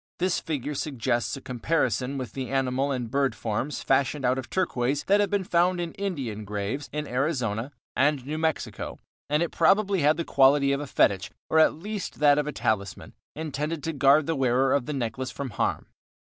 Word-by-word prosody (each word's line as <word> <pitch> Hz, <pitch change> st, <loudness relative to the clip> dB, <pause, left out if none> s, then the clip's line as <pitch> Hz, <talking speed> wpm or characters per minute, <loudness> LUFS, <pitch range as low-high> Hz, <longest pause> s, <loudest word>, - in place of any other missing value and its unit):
This 185 Hz, 0 st, +1 dB
figure 150 Hz, -2 st, -3 dB
suggests 120 Hz, -5 st, -1 dB
a -, -, -10 dB
comparison 125 Hz, 0 st, -1 dB
with 130 Hz, -2 st, -5 dB
the 130 Hz, -3 st, -4 dB
animal 135 Hz, +1 st, 0 dB
and 125 Hz, -4 st, -3 dB
bird 140 Hz, 0 st, +1 dB
forms 120 Hz, +6 st, -3 dB
fashioned 135 Hz, +1 st, +1 dB
out 130 Hz, +1 st, +2 dB
of 130 Hz, -, -8 dB
turquoise 140 Hz, -6 st, 0 dB
that 200 Hz, +1 st, +3 dB
have 205 Hz, -, +2 dB
been 205 Hz, -2 st, 0 dB
found 180 Hz, 0 st, +2 dB
in 170 Hz, -1 st, -3 dB
Indian 135 Hz, -, -4 dB
graves 105 Hz, +7 st, -4 dB
in 150 Hz, +1 st, -3 dB
Arizona 125 Hz, -3 st, -1 dB, 0.2 s
and 140 Hz, -1 st, +2 dB
New 155 Hz, +3 st, -3 dB
Mexico, 160 Hz, -1 st, -2 dB, 0.3 s
and 150 Hz, +3 st, +2 dB
it 170 Hz, -, -3 dB
probably 200 Hz, -1 st, +3 dB
had 150 Hz, +2 st, +4 dB
the 170 Hz, -, -2 dB
quality 140 Hz, +1 st, +4 dB
of 140 Hz, +1 st, 0 dB
a 145 Hz, -, -5 dB
fetich, 95 Hz, -6 st, +2 dB, 0.2 s
or 160 Hz, -, +5 dB
at 160 Hz, -, +5 dB
least 205 Hz, +4 st, -6 dB
of 145 Hz, 0 st, +4 dB
a -, -, -1 dB
talisman, 100 Hz, -7 st, -2 dB, 0.2 s
intended 155 Hz, 0 st, -3 dB
to 165 Hz, -, -2 dB
guard 140 Hz, +2 st, +4 dB
the 165 Hz, -, 0 dB
wearer 130 Hz, 0 st, +2 dB
of 140 Hz, -3 st, 0 dB
the 150 Hz, -, -2 dB
necklace 130 Hz, 0 st, -3 dB
from 135 Hz, -1 st, -5 dB
harm. -, -, -1 dB
140 Hz, 190 wpm, -26 LUFS, 125-155 Hz, 0.3 s, or